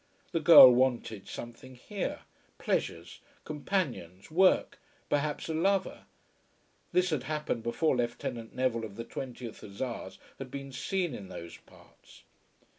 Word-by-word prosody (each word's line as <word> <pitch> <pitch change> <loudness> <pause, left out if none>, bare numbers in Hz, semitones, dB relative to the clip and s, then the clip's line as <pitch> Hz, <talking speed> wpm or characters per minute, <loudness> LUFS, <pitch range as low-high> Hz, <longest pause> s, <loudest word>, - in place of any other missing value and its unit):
The 170 - 0
girl 160 -7 +10
wanted 120 -5 0
something 120 +2 -9
here, 195 - -5 0.4
pleasures, - - -2 0.2
companions, 140 - -3
work, 185 +3 +3 0.3
perhaps 145 0 -1
a 160 - -2
lover. 190 +4 0 0.9
This 180 0 +2
had 150 -5 0
happened 150 -6 -2
before 130 +7 +1
Lieutenant 120 -1 -3
Neville 125 -3 0
of 105 -3 -7
the 115 +1 -6
20th 120 -2 -7
Hussars 100 -1 -6 0.2
had 135 -1 -7
been 140 0 -7
seen 175 +4 -2
in 100 -5 -8
those 85 0 -9
parts. - - -20
130 Hz, 125 wpm, -30 LUFS, 115-155 Hz, 0.9 s, girl